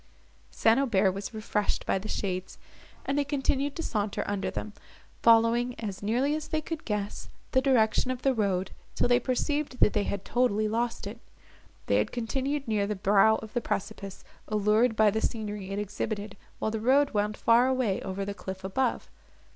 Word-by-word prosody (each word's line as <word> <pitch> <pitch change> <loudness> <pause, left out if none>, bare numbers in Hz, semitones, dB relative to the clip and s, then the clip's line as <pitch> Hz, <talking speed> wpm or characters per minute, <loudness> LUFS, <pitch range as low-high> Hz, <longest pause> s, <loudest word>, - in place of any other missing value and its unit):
St. 225 +3 +3
Aubert 205 -8 +3
was 195 +1 -5
refreshed 215 -2 -2
by - - +1
the 205 - -7
shades, 185 -3 -3 0.5
and 280 +1 0
they - - +3
continued 280 0 -1
to 330 - -4
saunter 210 -6 -1
under 200 -1 -2
them, 215 - -5 0.5
following, 235 +2 +4
as 205 -4 -5
nearly 245 +8 +1
as 310 0 -3
they 315 - -1
could 315 0 -6
guess, 210 -2 -3 0.2
the 260 - +3
direction 255 -2 +3
of 255 -1 -3
the 270 - +3
road, 195 -5 0 0.2
till - - +2
they 245 0 +4
perceived 260 +1 -1
that - - +4
they 205 - +1
had 200 -1 -4
totally 215 -4 +1
lost 230 +1 -1
it. 215 +4 -7 0.7
They - - +2
had - - 0
continued 270 +4 -2
near 210 -2 +1
the 210 - -2
brow 200 +3 +4
of 220 - -10
the 240 - 0
precipice, 195 -1 -4 0.2
allured 215 +3 +2
by 215 -1 +5
the 220 +2 -1
scenery 210 -3 -3
it 195 - -3
exhibited, 205 0 -4 0.2
while 220 - -1
the 220 - -2
road 270 +5 +3
wound 210 -1 0
far 235 +2 +4
away 255 -7 0
over 195 +1 -4
the 200 - -3
cliff 190 -1 -7
above. 240 +6 -1
220 Hz, 185 wpm, -28 LUFS, 205-255 Hz, 0.7 s, by